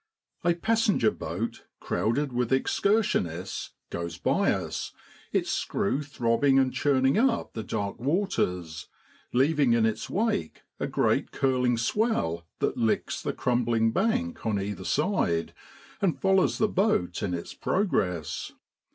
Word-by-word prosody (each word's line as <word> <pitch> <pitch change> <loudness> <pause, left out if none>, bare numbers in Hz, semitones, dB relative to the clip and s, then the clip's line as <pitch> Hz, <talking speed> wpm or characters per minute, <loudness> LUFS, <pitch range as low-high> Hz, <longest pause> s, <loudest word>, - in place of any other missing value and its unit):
A 175 -1 +3
passenger 215 - +2
boat, 90 +9 -5
crowded 135 +4 -1
with 120 0 0
excursion 200 - +2
ists, 85 +4 -6 0.2
goes 85 -1 -4
by - - +2
us, - - -3 0.4
its - - 0
screw 135 +8 0
throbbing 135 -1 +2
and 130 -1 +3
churning 135 +2 +2
up 240 -2 +1
the 110 - -4
dark 100 -1 -3
waters, 105 - -1 0.4
leaving 140 -1 +3
in 115 -1 +3
its 110 -1 -2
wake 200 - -1 0.2
a - - -1
great - - +1
curling 125 -3 +1
swell 115 - 0
that - - -1
licks 110 -2 0
the - - -1
crumbling 120 -2 +1
bank 245 - 0
on 110 -3 0
either 100 -1 -4
side 150 - 0 0.5
and 170 -9 +1
follows 190 +3 +3
the 215 - +3
boat 190 - +1
in 90 -3 -1
its 85 - -6
progress. 90 - -1
125 Hz, 135 wpm, -27 LUFS, -, 0.5 s, A